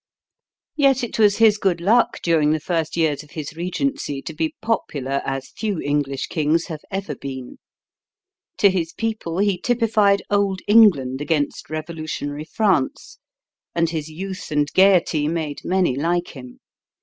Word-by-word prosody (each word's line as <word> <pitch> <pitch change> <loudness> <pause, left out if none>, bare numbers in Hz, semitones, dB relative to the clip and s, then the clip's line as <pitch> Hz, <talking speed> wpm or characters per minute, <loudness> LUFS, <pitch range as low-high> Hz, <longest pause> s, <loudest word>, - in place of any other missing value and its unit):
Yet 275 -3 +3
it 230 - -4
was 205 -2 +5
his 220 -2 +5
good 185 -4 +1
luck 220 +8 +2
during 160 -3 +3
the 155 - 0
first 165 0 -2
years 155 -4 +1
of 150 - -17
his 150 0 -6
regency 180 - -2
to 160 - -6
be 160 +1 -2
popular 140 - -2
as 135 -1 -4
few 205 -5 -3
English 145 -2 -1
kings 155 +2 0
have 155 -2 -7
ever 195 -5 -3
been. 130 -2 -8 1.0
To 200 - +5
his 170 -3 -2
people 220 -7 -3
he 200 -2 +1
typified 215 -4 +2
old 200 -2 +1
England 170 - +5
against 145 -2 -1
revolutionary 155 -2 -5
France; 185 -5 -1 0.6
and 170 -1 +1
his 160 -2 -4
youth 185 +4 -6
and 150 -1 +1
gaiety 180 -6 +4
made 155 -3 -3
many 185 -7 +1
like 170 +5 0
him. 125 -2 -11
165 Hz, 150 wpm, -21 LUFS, 150-200 Hz, 1.0 s, was